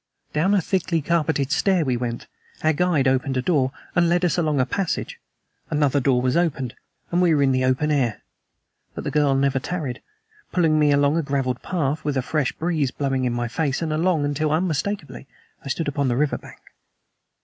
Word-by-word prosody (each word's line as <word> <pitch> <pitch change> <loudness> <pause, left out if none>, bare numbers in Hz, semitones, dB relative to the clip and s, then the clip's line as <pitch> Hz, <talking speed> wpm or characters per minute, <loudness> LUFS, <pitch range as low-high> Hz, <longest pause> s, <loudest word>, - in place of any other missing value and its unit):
Down 180 +7 +2
a 195 - +3
thickly 180 -2 0
carpeted 155 -4 0
stair 180 0 +2
we 130 -2 +1
went. 120 -1 -4 0.4
Our 155 0 +3
guide 155 -4 +2
opened 130 0 +1
a - - +1
door, 135 -6 +2 0.2
and 175 -1 +3
led 175 +1 +2
us 175 - +1
along 155 -5 +1
a 130 - +3
passage. 195 - -3 0.5
Another 145 -2 +2
door 125 -2 +2
was 130 -1 +1
opened; 150 -8 0 0.4
and 175 +1 +2
we 170 -3 +4
were 145 - +3
in 135 - +3
the 130 0 +1
open 130 +4 +1
air. 125 -8 0 0.7
But - - -5
the - - -3
girl 145 -2 +2
never 135 0 +2
tarried, 145 -3 -4 0.5
pulling 160 -4 +2
me 150 -1 +4
along 145 +2 +3
a - - +2
graveled 135 -4 -1
path, 155 -3 -2
with 145 -2 -1
a 130 - 0
fresh 150 -1 0
breeze 160 -5 -1
blowing 135 -1 -1
in 120 - 0
my 120 0 -1
face, 140 +3 -1
and 155 -1 -1
along 160 -1 +1
until, 145 +1 0
unmistakably, 160 -1 -2 0.4
I - - -9
stood 150 +4 -2
upon 140 -1 0
the 120 -1 0
river 150 +1 +1
bank. - - -13
145 Hz, 200 wpm, -23 LUFS, 135-165 Hz, 0.7 s, we